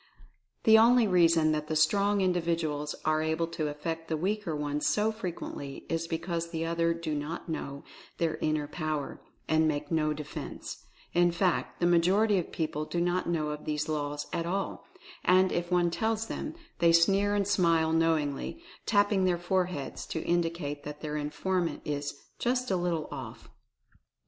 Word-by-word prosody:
The 220 0 +8
only 235 0 +6
reason 165 -4 +4
that 150 0 -1
the 155 - -2
Strong 200 +6 +3
Individuals 165 -5 0
are 155 0 +2
able 160 +1 0
to 165 -2 -2
affect 160 +2 -4
the 160 - -1
weaker 190 -1 -1
ones 150 0 -1
so 215 +1 +2
frequently 175 -9 -6
is 165 0 -1
because 170 0 -2
the 165 -1 -2
other 165 0 +1
do 165 -2 -3
not 150 +4 -4
know 140 -3 -5 0.3
their 165 -2 0
inner 155 -1 0
Power, 155 -2 -3 0.3
and 160 0 +3
make 145 0 -2
no 155 -2 +2
defense 150 -1 -6 0.2
— - - -28
in 175 0 +4
fact, 175 +1 0
the 175 - +2
majority 185 +4 +4
of 170 - -5
people 155 -2 -2
do 170 - -2
not 175 +1 0
know 155 -3 0
of 150 0 -6
these 150 0 -1
laws 145 -1 -2
at 170 0 -1
all; 195 +3 -3 0.4
and, 185 +1 +4
if 175 0 -1
one 175 -1 +2
tells 220 +3 0
them, 305 +7 -5 0.2
they 170 0 +5
sneer 195 +5 +4
and 200 -1 +1
smile 165 -5 +3
knowingly, 160 - 0 0.3
tapping 205 -2 +3
their 180 -1 +2
foreheads 175 -5 -2
to 160 - -3
indicate 165 -4 -1
that 150 0 -7
their 150 -1 -4
informant 170 +4 -1
is 145 -1 -3 0.2
"just 250 -1 0
a - - +3
little 175 -3 -1
off." - - -8
165 Hz, 170 wpm, -29 LUFS, 155-185 Hz, 0.4 s, The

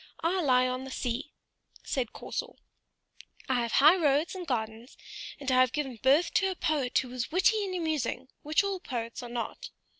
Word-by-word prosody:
I 360 +3 +1
lie 255 -4 +4
on 255 +1 -3
the 265 - -7
sea," 255 +3 -3 0.5
said 250 -4 -2
Corsor; 485 0 -5 0.9
"I 255 -3 +1
have 235 -1 -3
high 305 +6 +7
roads 300 -1 +2
and 365 -2 -7
gardens, 225 -1 -4 0.4
and 275 -2 -2
I 255 - +4
have 255 0 +4
given 270 -5 -3
birth 280 +6 +3
to 385 -2 +3
a 375 - -3
poet 290 -7 0
who 260 - 0
was 250 +1 -4
witty 400 +5 +3
and 375 -1 -4
amusing, 305 -7 -2
which 305 +5 +2
all 395 -1 -2
poets 235 -7 -5
are 245 - -8
not. 235 -2 -5
270 Hz, 185 wpm, -29 LUFS, 250-330 Hz, 0.9 s, high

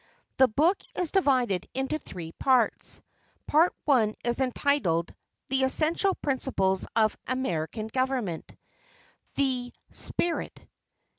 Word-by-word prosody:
The 260 - +8
book 315 - +2
is 355 -4 -1
divided 255 - +2
into 270 +4 -1
three 165 - -8
parts. 255 +3 +1 0.4
Part 320 +4 +4 0.2
I 225 -7 +3
is 240 +1 0
entitled 250 - +1 0.4
"The 270 0 +1
Essential 320 +8 +2
Principles 195 -9 0
of 220 -2 +3
American 215 -5 -2
Government. 245 -7 -2 0.8
The 255 -3 0 0.2
Spirit." 345 -1 -2
260 Hz, 100 wpm, -28 LUFS, 215-280 Hz, 0.8 s, The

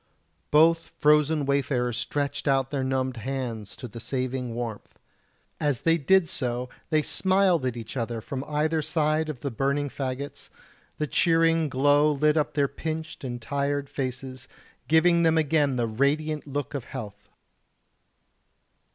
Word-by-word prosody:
Both 165 +2 +4
frozen 150 0 +3
wayfarers 135 -3 0
stretched 140 +4 -2
out 135 -1 +2
their 140 -2 -1
numbed 130 -1 -1
hands 115 -4 -4
to 125 - -8
the 115 +1 -9
saving 125 -1 -3
warmth. 115 -3 -6 0.6
As 145 -5 0
they 165 0 +3
did 190 +4 +4
so 125 -4 -2 0.2
they 155 -1 +2
smiled 185 -7 +2
at 120 -1 -3
each 115 +1 -7
other 115 -2 -2
from 130 +4 -5
either 155 +2 0
side 155 +1 0
of 140 -6 -6
the 140 - -3
burning 140 +4 0
faggots; 135 +1 -5 0.5
the 150 - 0
cheering 165 0 +3
glow 145 +3 +4
lit 150 +1 +2
up 150 -2 0
their 140 -2 +3
pinched 160 +3 -5
and 120 -2 -4
tired 140 +4 -2
faces, 130 -1 -5 0.4
giving 170 +2 +4
them 160 -1 +3
again 150 -3 +2
the 120 -2 +1
radiant 145 +7 0
look 145 +1 -4
of 135 -4 -4
health. 105 -7 -8
140 Hz, 145 wpm, -26 LUFS, 130-155 Hz, 0.6 s, Both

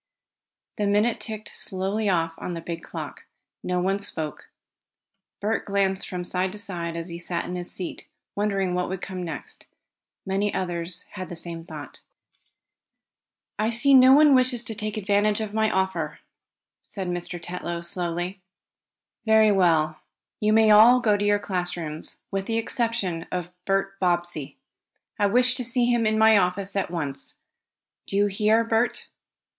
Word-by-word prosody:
The 205 - +1
minute 210 +3 +2
ticked 215 -2 -6
slowly 195 +3 -1
off 165 -3 +1
on 180 - -4
the 165 - -5
big 165 0 -5
clock. - - -8 0.4
No 180 0 -1
one 195 +2 0
spoke. 160 -6 -5 0.9
Bert 215 +2 -1
glanced 195 -2 0
from 180 -1 -4
side 185 +1 -1
to - - -8
side 175 -5 -4
as 170 +1 -5
he 170 0 -6
sat 175 0 -3
in 180 - -5
his 175 0 -4
seat, 180 - -6 0.3
wondering 195 -3 0
what 180 0 -1
would 190 0 -3
come 185 -1 -5
next. 165 -4 -8 0.6
Many 195 +2 0
others 175 -1 -3
had 185 -2 -7
the 175 - -6
same 165 0 -6
thought. 150 -5 -10 1.6
"I 215 +1 +2
see 240 +4 +5
no 260 0 +8
one 295 +1 +7
wishes 255 -2 +3
to 230 - -4
take 215 0 -4
advantage 205 +1 +2
of 215 -2 -4
my 220 0 +2
offer," 190 -1 -1 0.6
said 190 -3 -5
Mr. 175 0 -4
Tetlow 175 0 -5
slowly. 175 +2 -2 0.9
"Very 220 -1 +6
well. 160 -5 +2 0.4
You 210 0 +2
may 220 0 +5
all 225 +4 +8
go 220 -4 +3
to 205 - -1
your 205 0 +3
class 180 -3 -2
rooms, 155 -2 -5
with 195 0 -2
the 225 - 0
exception 225 -7 -1
of 180 -1 -4
Bert 195 0 0
Bobbsey. 175 -5 -1 0.6
I 205 - +4
wish 245 +4 +3
to 255 - -2
see 245 0 +2
him 235 -2 +2
in 220 0 +1
my 220 -1 +6
office 190 +2 0
at 195 - 0
once. 145 -5 -4 0.7
Do - - -4
you 205 - +4
hear, 210 +3 +2
Bert?" 230 +1 0
195 Hz, 160 wpm, -25 LUFS, 175-215 Hz, 1.6 s, no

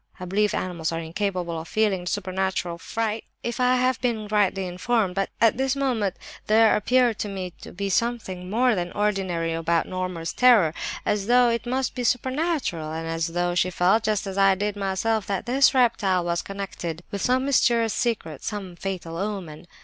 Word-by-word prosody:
I 185 - -5
believe 205 +3 +1
animals 170 -3 -2
are 165 - -2
incapable 170 -1 -3
of 165 - -11
feeling 195 -4 0
supernatural 185 -3 -2
fright—if 225 +3 -4
I 250 0 +4
have 255 0 +1
been 225 -4 -1
rightly 200 -2 +1
informed,—but 195 +1 0
at 230 0 +4
this 265 +1 +1
moment 240 -9 0 0.3
there 220 +1 +5
appeared 245 +1 +2
to - - -2
me 185 -3 -5
to - - -9
be 200 +2 -3
something 190 -5 -1
more 245 +4 +3
than 175 -3 -2
ordinary 190 -5 0
about 165 0 0
Norma's 185 -3 -4
terror, 225 -11 +5 0.3
as 205 -1 0
though 245 0 +5
it 235 0 -2
must 260 +1 -1
be 250 - -4
supernatural; 255 - -1
and 165 +1 -4
as 165 0 -1
though 175 +1 -1
she 180 +1 +2
felt, 185 +5 +3
just 215 -1 0
as 195 0 -3
I 195 -1 +5
did 205 +2 -2
myself, 200 +2 -1
that 195 -2 -2
this 265 +2 +4
reptile 200 -8 +2
was 170 0 0
connected 180 -4 -6
with 200 - -4
some 255 +1 +2
mysterious 235 -5 +3
secret, 205 - -2
some 195 -4 -5
fatal 175 -2 -5
omen. 185 -5 -5
200 Hz, 175 wpm, -24 LUFS, 180-230 Hz, 0.3 s, there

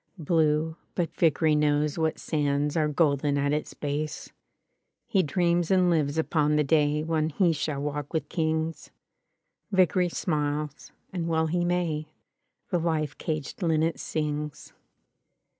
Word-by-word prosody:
Blue, 160 -1 +1 0.2
but 175 -3 -1
Vickeiy 160 -1 +3
knows 150 0 +2
what 160 -1 0
sands 145 -1 0
Are 155 -2 +2
golden 145 -2 +2
at 140 +1 +1
its 150 - -3
base. 150 +1 -4 0.7
He 195 - +2
dreams 175 +1 +1
and 185 -2 +4
lives 150 -2 +1
upon 150 -2 +2
the 150 - +3
daj 150 0 +2
When 160 -1 0
he 170 +2 +2
shall 150 -2 -2
walk 145 0 -3
with 155 -3 -2
kings. 160 0 -2 0.8
Vickery 185 -1 +3
smiles 150 -3 -2
— - - -40
^and 175 -3 -2
well 160 -1 +1
he 175 +2 0
may: 170 -3 -1 0.6
The 175 - +2
life 155 -4 -1
caged 155 +3 -4
linnet 160 -1 +1
sings. 150 -1 -4
155 Hz, 140 wpm, -27 LUFS, 150-165 Hz, 0.8 s, and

